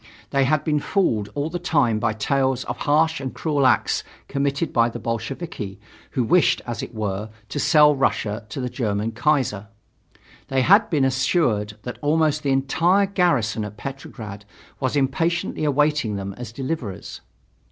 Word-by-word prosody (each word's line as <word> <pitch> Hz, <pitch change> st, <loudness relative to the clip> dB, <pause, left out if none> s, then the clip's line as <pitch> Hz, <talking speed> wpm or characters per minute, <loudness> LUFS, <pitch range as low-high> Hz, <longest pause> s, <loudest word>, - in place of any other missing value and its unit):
They 135 Hz, -1 st, +3 dB
had 155 Hz, +2 st, +2 dB
been 150 Hz, -1 st, +1 dB
fooled 115 Hz, -, 0 dB
all 145 Hz, +2 st, -2 dB
the 175 Hz, -, -3 dB
time 145 Hz, -10 st, +2 dB
by 110 Hz, 0 st, 0 dB
tales 130 Hz, +3 st, 0 dB
of -, -, -4 dB
harsh 155 Hz, +1 st, +2 dB
and 130 Hz, -1 st, -5 dB
cruel 145 Hz, -4 st, +2 dB
acts -, -, +2 dB, 0.2 s
committed 140 Hz, +2 st, -1 dB
by 115 Hz, -1 st, +4 dB
the -, -, -6 dB
Bolsheviki, 115 Hz, -, -5 dB, 0.4 s
who 125 Hz, -, +3 dB
wished, 175 Hz, +8 st, +3 dB
as 120 Hz, -3 st, -4 dB
it -, -, -8 dB
were, 105 Hz, 0 st, -3 dB, 0.2 s
to 145 Hz, -, -3 dB
sell 150 Hz, -1 st, +5 dB
Russia 110 Hz, -5 st, 0 dB
to 120 Hz, -, -5 dB
the 125 Hz, -, -2 dB
German 110 Hz, -3 st, -2 dB
Kaiser. 120 Hz, -5 st, 0 dB, 0.8 s
They 135 Hz, -1 st, +1 dB
had 200 Hz, -, +5 dB
been 145 Hz, -6 st, +2 dB
assured 130 Hz, -, +1 dB
that 125 Hz, -, -6 dB
almost 155 Hz, 0 st, +2 dB
the 140 Hz, -, -1 dB
entire 165 Hz, +9 st, +3 dB
garrison 160 Hz, -, +1 dB
at 105 Hz, 0 st, -7 dB
Petrograd 110 Hz, -5 st, -7 dB, 0.4 s
was 130 Hz, 0 st, -1 dB
impatiently 155 Hz, +5 st, 0 dB
awaiting 150 Hz, -6 st, +1 dB
them 100 Hz, 0 st, -4 dB
as 120 Hz, +1 st, -8 dB
deliverers. 130 Hz, -, -5 dB
135 Hz, 160 wpm, -23 LUFS, 110-150 Hz, 0.8 s, sell